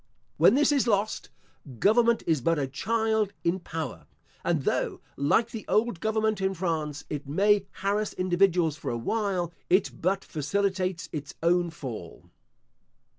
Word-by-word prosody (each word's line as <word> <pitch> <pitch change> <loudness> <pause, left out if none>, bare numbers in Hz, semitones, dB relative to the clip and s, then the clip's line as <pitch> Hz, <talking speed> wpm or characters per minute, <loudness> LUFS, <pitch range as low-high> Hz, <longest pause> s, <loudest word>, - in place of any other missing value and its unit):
When - - +6
this 295 +2 +4
is 275 -4 +2
lost, 210 -1 0 0.5
government 230 - +3
is 160 -5 +1
but 165 +5 +2
a 140 - 0
child 220 - 0
in 175 +3 +1
power; 165 -3 -6 0.4
and - - 0
though, - - -1 0.2
like 225 +12 +2
the 225 - -6
old 215 -4 +1
government 220 0 0
in 190 0 0
France, 155 -5 -2
it 145 -2 -5
may 200 +6 +3
harass 205 +2 -1
individuals 180 -3 +2
for 150 - -5
a 120 - -2
while, 180 - -1 0.2
it 185 +2 +3
but 190 +3 0
facilitates 185 +2 -1
its 145 -2 -6
own 175 +1 +3
fall. 120 - -8
185 Hz, 145 wpm, -27 LUFS, 160-215 Hz, 0.5 s, When